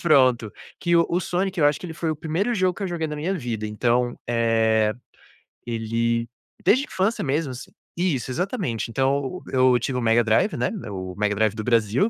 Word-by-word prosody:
pronto, 130 Hz, -9 st, +3 dB, 0.3 s
que 170 Hz, -1 st, +2 dB
o 170 Hz, -, +5 dB
o 175 Hz, +2 st, +1 dB
Sonic, 185 Hz, +2 st, -2 dB
eu 145 Hz, -, +5 dB
acho 145 Hz, -, +1 dB
que -, -, -6 dB
ele 165 Hz, -, -7 dB
foi 165 Hz, -1 st, -2 dB
o 155 Hz, -, -2 dB
1º 175 Hz, +9 st, -1 dB
jogo 185 Hz, -4 st, +1 dB
que 200 Hz, -, -3 dB
eu -, -, -2 dB
joguei 165 Hz, -2 st, -2 dB
na 150 Hz, -, -4 dB
minha 175 Hz, +6 st, -1 dB
vida, 115 Hz, -, -3 dB
então, 120 Hz, +3 st, 0 dB
eh, 110 Hz, -2 st, +2 dB, 0.7 s
ele 115 Hz, 0 st, -1 dB, 0.4 s
desde 265 Hz, +6 st, +4 dB
a -, -, -10 dB
infância 195 Hz, +5 st, 0 dB
mesmo, 140 Hz, 0 st, -1 dB
assim 125 Hz, -, -9 dB, 0.2 s
Isso, 155 Hz, -9 st, -1 dB
exatamente. 145 Hz, -, -2 dB
Então, 135 Hz, +6 st, 0 dB
eu 130 Hz, -1 st, +4 dB
tive 125 Hz, 0 st, -2 dB
o -, -, 0 dB
Mega 115 Hz, 0 st, +3 dB
Drive, 110 Hz, -, +2 dB
né, -, -, 0 dB, 0.2 s
o 95 Hz, -2 st, -5 dB
Mega 105 Hz, 0 st, +1 dB
Drive 110 Hz, 0 st, +1 dB
do 110 Hz, -, -4 dB
Brasil, 115 Hz, -, +2 dB
130 Hz, 205 wpm, -24 LUFS, 115-170 Hz, 0.7 s, o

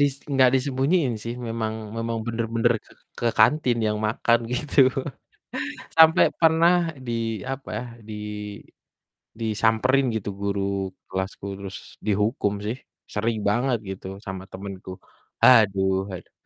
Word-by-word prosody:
dis 145 Hz, -1 st, +3 dB, 0.2 s
nggak 130 Hz, -1 st, +6 dB
disembunyiin 135 Hz, +2 st, +1 dB
sih, 115 Hz, +1 st, -3 dB
memang 110 Hz, -1 st, -2 dB, 0.2 s
memang 115 Hz, 0 st, -2 dB
bener-bener 115 Hz, +1 st, +1 dB
ke -, -, -20 dB, 0.3 s
ke 120 Hz, -, -1 dB
kantin 120 Hz, +2 st, +4 dB
yang 105 Hz, 0 st, 0 dB
makan 115 Hz, +2 st, +2 dB
gitu. 145 Hz, +3 st, -3 dB, 1.2 s
Sampai 160 Hz, 0 st, +8 dB
pernah 165 Hz, +1 st, +5 dB, 0.3 s
di 120 Hz, -, -2 dB, 0.4 s
apa 135 Hz, 0 st, -7 dB
ya, -, -, -5 dB, 0.2 s
di 110 Hz, -, -6 dB, 1.3 s
disamperin 115 Hz, +4 st, +2 dB
gitu 105 Hz, -2 st, -3 dB
guru 100 Hz, 0 st, -1 dB, 0.5 s
kelasku 95 Hz, +1 st, -4 dB
terus 100 Hz, -1 st, -7 dB, 0.3 s
dihukum 105 Hz, 0 st, +1 dB
sih. 110 Hz, +4 st, -2 dB, 0.4 s
Sering 110 Hz, +2 st, 0 dB
banget, 120 Hz, +3 st, +1 dB
gitu, 95 Hz, 0 st, -6 dB, 0.2 s
sama 95 Hz, -2 st, -5 dB
temenku. 95 Hz, -1 st, -7 dB, 0.5 s
Aduh 95 Hz, -5 st, +5 dB
aduh. 90 Hz, -, -9 dB
115 Hz, 120 wpm, -24 LUFS, 100-130 Hz, 1.3 s, Sampai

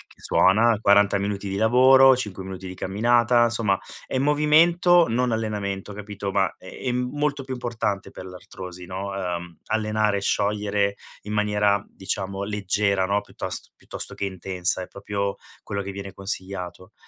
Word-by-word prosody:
che -, -, -23 dB
suona, 110 Hz, +3 st, +4 dB
40 100 Hz, -1 st, +4 dB
minuti 100 Hz, 0 st, -3 dB
di 95 Hz, -, -3 dB
lavoro, 130 Hz, +4 st, +6 dB
5 105 Hz, -7 st, -5 dB
minuti 95 Hz, 0 st, -7 dB
di 90 Hz, -, -6 dB
camminata, 120 Hz, +5 st, +3 dB
insomma 110 Hz, -4 st, +1 dB, 0.3 s
è 130 Hz, -, -2 dB
movimento 160 Hz, +5 st, +4 dB
non 125 Hz, +1 st, +1 dB
allenamento 105 Hz, -3 st, -3 dB
capito. 100 Hz, -1 st, -5 dB
Ma, 95 Hz, -1 st, +1 dB
ehm, 125 Hz, +5 st, -3 dB
è -, -, -10 dB
molto 145 Hz, -1 st, 0 dB
più 130 Hz, 0 st, -5 dB
importante 115 Hz, -5 st, -3 dB
per -, -, -9 dB
l'artrosi, 90 Hz, 0 st, -9 dB
no, 95 Hz, +2 st, -5 dB
uhm, 90 Hz, -3 st, -4 dB
allenare 110 Hz, -1 st, +1 dB
e -, -, -3 dB
sciogliere 100 Hz, 0 st, 0 dB, 0.3 s
in 105 Hz, -, -5 dB
maniera 105 Hz, -1 st, +2 dB
diciamo 95 Hz, 0 st, -4 dB
leggera, 100 Hz, -1 st, 0 dB
no, 100 Hz, +1 st, +1 dB
piuttos -, -, -6 dB
piuttosto -, -, -8 dB
che 100 Hz, -, -3 dB
intensa, 95 Hz, -1 st, -2 dB
è 90 Hz, -, -6 dB
proprio 100 Hz, +1 st, -3 dB, 0.3 s
quello 100 Hz, 0 st, -3 dB
che 100 Hz, 0 st, -5 dB
viene 100 Hz, 0 st, -7 dB
consigliato. 95 Hz, 0 st, -6 dB
100 Hz, 155 wpm, -24 LUFS, 95-115 Hz, 0.3 s, lavoro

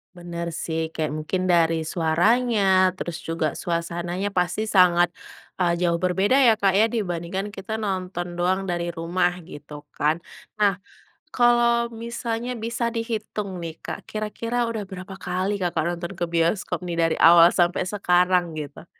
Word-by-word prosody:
Bener 170 Hz, -1 st, -6 dB, 0.2 s
sih 160 Hz, -1 st, -2 dB
kayak 155 Hz, -2 st, -1 dB
mungkin 180 Hz, +4 st, -2 dB
dari 165 Hz, -2 st, +3 dB
suaranya, 200 Hz, +9 st, +2 dB, 0.3 s
terus 170 Hz, -2 st, -5 dB
juga 165 Hz, -2 st, -2 dB
suasananya 175 Hz, +3 st, -2 dB
pasti 180 Hz, +1 st, 0 dB
sangat, 175 Hz, -2 st, +5 dB, 0.5 s
eee, 175 Hz, -2 st, +2 dB
jauh 170 Hz, -1 st, +2 dB
berbeda 190 Hz, +7 st, +2 dB
ya 225 Hz, -, +6 dB
Kak 200 Hz, -2 st, +2 dB
ya, 220 Hz, -, +6 dB
dibandingkan 190 Hz, -3 st, -3 dB
kita 200 Hz, +2 st, -6 dB
nonton 180 Hz, -3 st, -3 dB
doang 185 Hz, +2 st, +1 dB
dari 175 Hz, 0 st, -2 dB
rumah 175 Hz, +1 st, 0 dB
gitu 150 Hz, -2 st, -11 dB, 0.2 s
kan. 155 Hz, +3 st, +1 dB, 0.3 s
Nah, 200 Hz, -3 st, +2 dB, 0.5 s
kalau 235 Hz, -1 st, +3 dB
misalnya 235 Hz, +1 st, -4 dB
bisa 235 Hz, +1 st, -2 dB
dihitung 215 Hz, -5 st, -4 dB
nih 165 Hz, -1 st, -6 dB
Kak, -, -, -5 dB
kira-kira 230 Hz, +3 st, -2 dB
udah 230 Hz, -2 st, -3 dB
berapa 190 Hz, 0 st, -8 dB
kali 190 Hz, +2 st, -2 dB
Kakak 175 Hz, -3 st, 0 dB
nonton 175 Hz, +2 st, -6 dB
ke 175 Hz, -, -1 dB
bioskop 170 Hz, +5 st, 0 dB
nih 175 Hz, -2 st, -4 dB
dari 165 Hz, -1 st, +2 dB
awal 170 Hz, +1 st, +8 dB
sampai 175 Hz, 0 st, +1 dB
sekarang 180 Hz, -3 st, +1 dB
gitu? 145 Hz, +1 st, -7 dB
180 Hz, 145 wpm, -24 LUFS, 170-210 Hz, 0.5 s, awal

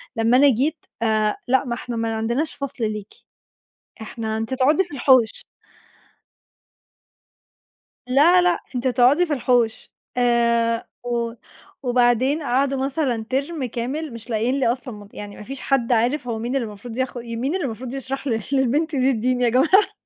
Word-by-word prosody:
لمّا 230 Hz, +2 st, +3 dB
أنا 285 Hz, +1 st, +6 dB
جيت: 280 Hz, +7 st, 0 dB, 0.2 s
آآ، 215 Hz, -2 st, +1 dB
لأ 265 Hz, +2 st, +2 dB
ما 240 Hz, -, -2 dB
إحنا 240 Hz, -1 st, -6 dB
ما 225 Hz, 0 st, -1 dB
عندناش 235 Hz, +8 st, -1 dB
فصل 270 Hz, -5 st, -4 dB
ليكِ، 210 Hz, -1 st, -7 dB, 0.9 s
إحنا 220 Hz, 0 st, -4 dB
أنتِ 225 Hz, +3 st, -3 dB
تقعدي 290 Hz, +8 st, +3 dB
في 350 Hz, -, -14 dB
الحوش. 255 Hz, -4 st, +3 dB, 2.6 s
لأ 320 Hz, +8 st, +5 dB
لأ، 355 Hz, -1 st, +2 dB, 0.2 s
أنتِ 250 Hz, +1 st, 0 dB
هتقعدي 255 Hz, +7 st, +4 dB
في 315 Hz, -, -2 dB
الحوش 245 Hz, -4 st, 0 dB, 0.3 s
آآ، 235 Hz, -1 st, +2 dB, 0.2 s
و 235 Hz, -1 st, -2 dB, 0.5 s
وبعدين 250 Hz, +4 st, +2 dB
قعدوا 270 Hz, +1 st, +1 dB
مثلًا 265 Hz, -6 st, -1 dB
ترم 275 Hz, +2 st, -2 dB
كامل 255 Hz, +5 st, -4 dB
مش 230 Hz, +1 st, -10 dB
لاقيين 235 Hz, +5 st, 0 dB
لي 250 Hz, -, +2 dB
أصلًا 250 Hz, -1 st, -5 dB
م 205 Hz, -1 st, -11 dB
يعني 205 Hz, -1 st, -8 dB
ما -, -, -9 dB
فيش 270 Hz, +3 st, -7 dB
حد 260 Hz, -3 st, 0 dB
عارف 245 Hz, +4 st, +1 dB
هو 225 Hz, -2 st, -2 dB
مين 240 Hz, +4 st, -3 dB
اللي 240 Hz, -5 st, 0 dB
مفروض 220 Hz, +3 st, -9 dB
ياخد 260 Hz, -2 st, -2 dB
مين 235 Hz, +7 st, -3 dB
اللي 335 Hz, -8 st, -1 dB
مفروض 245 Hz, +3 st, -6 dB
يشرح 270 Hz, +1 st, -5 dB
ل 225 Hz, -3 st, 0 dB
للبنت 280 Hz, +4 st, +1 dB
دي 265 Hz, +1 st, +3 dB
الدين 250 Hz, +2 st, 0 dB
يا 240 Hz, -, +4 dB
جماعة. 370 Hz, -, +4 dB
250 Hz, 160 wpm, -22 LUFS, 230-275 Hz, 2.6 s, أنا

